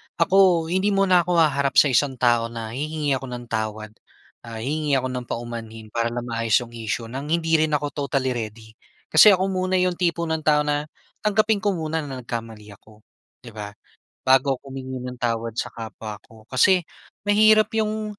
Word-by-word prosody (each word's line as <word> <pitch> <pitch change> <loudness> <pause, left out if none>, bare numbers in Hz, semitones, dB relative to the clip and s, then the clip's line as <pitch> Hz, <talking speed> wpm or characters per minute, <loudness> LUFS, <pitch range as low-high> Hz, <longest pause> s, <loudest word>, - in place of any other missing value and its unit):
ako, 180 -2 +3
hindi 195 +2 +1
muna 185 -3 +4
ako 180 -1 0
haharap 140 -4 +2
sa 145 - +6
isang 135 +2 +2
tao 120 -2 +2
na 115 -1 -7
hihingi 150 +2 -2
ako 135 - -8
ng 120 0 -8
tawad, 110 -1 -3 0.6
ah, 110 -1 -7
hihingi 150 0 0
ako 130 -1 0
ng 125 -1 -5
paumanhin, 115 -2 -6
para 115 0 0
lang 120 0 -4
maayos 115 -2 0
'yong 120 -1 -9
issue 115 0 -4
nang 135 +3 -5
hindi 165 0 +2
rin 155 -1 +2
ako 145 0 -2
totally 130 -1 0
ready. 110 -1 -6 0.4
Kasi 210 -2 +8
ako 190 +1 -1
muna 185 0 -1
'yong 180 -1 +1
tipo 170 -1 0
ng 160 -1 -1
tao 150 -1 +2
na 150 0 -1 0.3
tanggapin 215 0 +2
ko 205 -3 0
muna 160 0 -2
na 135 -4 -6
nagkamali 115 -3 -7
ako, 110 0 -21 0.4
'di 120 - -10
ba, 105 -1 -8 0.5
bago 135 0 +4
'ko 140 - -22
humingi 130 -1 -6
ng 125 0 -6
tawad 115 -1 -2
sa - - -3
kapwa 110 -2 -8
ko. 110 -1 -17
Kasi 180 +7 +4 0.4
mahirap 215 +1 +4
'yong 215 -1 -2
135 Hz, 185 wpm, -23 LUFS, 115-170 Hz, 0.6 s, Kasi